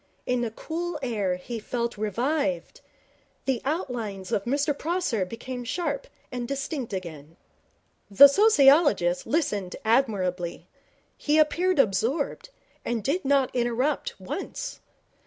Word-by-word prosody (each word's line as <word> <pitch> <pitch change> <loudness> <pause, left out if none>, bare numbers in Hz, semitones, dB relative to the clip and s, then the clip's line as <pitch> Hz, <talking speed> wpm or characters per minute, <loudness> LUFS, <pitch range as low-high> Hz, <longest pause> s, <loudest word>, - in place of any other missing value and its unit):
In 250 -1 0
the 235 - -1
cool 330 +8 -4
air 205 -7 0
he 225 +6 -6
felt 235 +2 -3
revived. 235 - -1 0.6
The 260 -4 0
outlines 235 - -3
of 200 - 0
Mr 285 +3 +1
Prosser 315 - -1
became 245 +5 -6
sharp 285 +1 -3 0.2
and 245 -1 -4
distinct 275 -2 -4
again. 165 -4 -7 0.7
The 205 +8 +10
sociologist 280 - +4
listened 240 - -1
admirably. 195 -8 0 0.5
He 300 +1 +1
appeared 340 +4 +3
absorbed, 250 - 0 0.3
and 230 -3 -2
did 320 - 0
not 275 -1 +3
interrupt 255 - -1
once. - - -5
250 Hz, 115 wpm, -26 LUFS, 205-295 Hz, 0.7 s, The